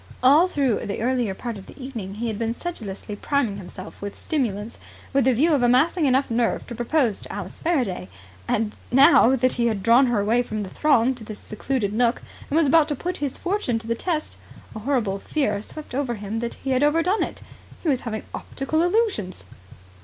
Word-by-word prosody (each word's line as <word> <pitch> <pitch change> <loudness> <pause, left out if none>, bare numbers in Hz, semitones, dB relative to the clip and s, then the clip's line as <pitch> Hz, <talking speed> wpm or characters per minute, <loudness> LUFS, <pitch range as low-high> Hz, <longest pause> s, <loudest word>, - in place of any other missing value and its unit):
All 295 +8 +6
through 275 - 0
the 200 - -3
earlier 240 -5 0
part 235 -2 -5
of 190 - -13
the - - -14
evening 230 -8 -6
he 230 +3 -4
had 220 -2 -3
been 230 0 -1
sedulously 215 - -6
priming 235 -4 0
himself 185 0 -10
with 200 0 -6
stimulants 225 -7 -2 0.3
with 270 -2 +3
a 260 - +5
view 300 +8 +3
to 290 -6 +3
amassing 285 +7 +3
enough 265 0 +2
nerve 230 0 0
to - - -7
propose 240 -1 +1
to - - -7
Alice 195 -2 -7
Faraday: 245 - -1 0.4
and, 215 -1 0 0.2
now 265 -1 +7
that 255 0 +2
he 235 -1 +1
had 210 -4 -1
drawn 240 +3 +6
her 240 -3 +1
away 220 +4 +2
from 215 -3 -4
the 190 - -7
throng 265 -4 +3
to 245 -3 -10
this 215 -1 -8
secluded 215 -1 -2
nook 235 +2 +1 0.3
and 295 - +1
was 330 - +5
about 305 +2 +5
to 295 - -1
put 360 +6 -3
his 285 -2 -3
fortune 355 - -1
to 225 - -7
the 230 - 0
test, 310 +5 -3 0.4
a - - -4
horrible 220 -5 0
fear 210 -6 -1
swept 305 +6 -8
over 260 -3 -1
him 210 +1 -4
that 235 0 -3
he 270 - -4
had 255 0 +2
overdone 330 +7 +2
it. - - -4 0.4
He - - -3
was 265 -4 +2
having 220 -3 -4
optical 300 +4 -2
illusions. 350 - 0
245 Hz, 205 wpm, -24 LUFS, 215-285 Hz, 0.4 s, now